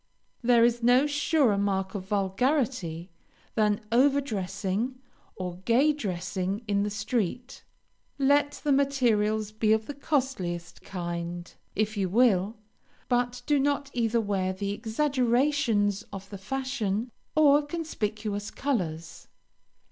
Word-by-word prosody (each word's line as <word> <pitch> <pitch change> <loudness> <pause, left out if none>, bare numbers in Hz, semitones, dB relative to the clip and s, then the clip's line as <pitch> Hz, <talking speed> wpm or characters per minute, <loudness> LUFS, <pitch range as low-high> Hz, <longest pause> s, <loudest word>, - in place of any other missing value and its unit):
There 235 -1 +5
is 240 0 +1
no 245 +4 +5
surer 290 -7 +2
mark 195 -1 0
of 190 -2 -5
vulgarity 200 - 0 0.4
than 210 -1 +2
over 275 +4 +4
dressing 200 0 -2 0.4
or 180 -2 -5
gay 240 +10 +3
dressing 190 -3 -3
in 200 -1 +1
the 205 - 0
street. 220 +3 -3 0.5
Let 285 +1 +3
the 295 - +1
materials 225 -7 +2
be 215 0 +2
of 220 0 0
the 290 - -5
costliest 250 - -2
kind, 175 -1 -5 0.2
if 215 +1 0
you 190 -2 0
will, 215 -1 +3 0.5
but 245 0 0
do 295 -1 +3
not 280 0 0
either 235 -1 +1
wear 195 -3 -1
the 200 +1 -3
exaggerations 240 -3 +1
of 195 0 -8
the 200 - -7
fashion, 240 -1 -2 0.2
or 295 -1 +6
conspicuous 215 -10 -3
colors. 175 - -3
220 Hz, 120 wpm, -27 LUFS, 195-265 Hz, 0.5 s, or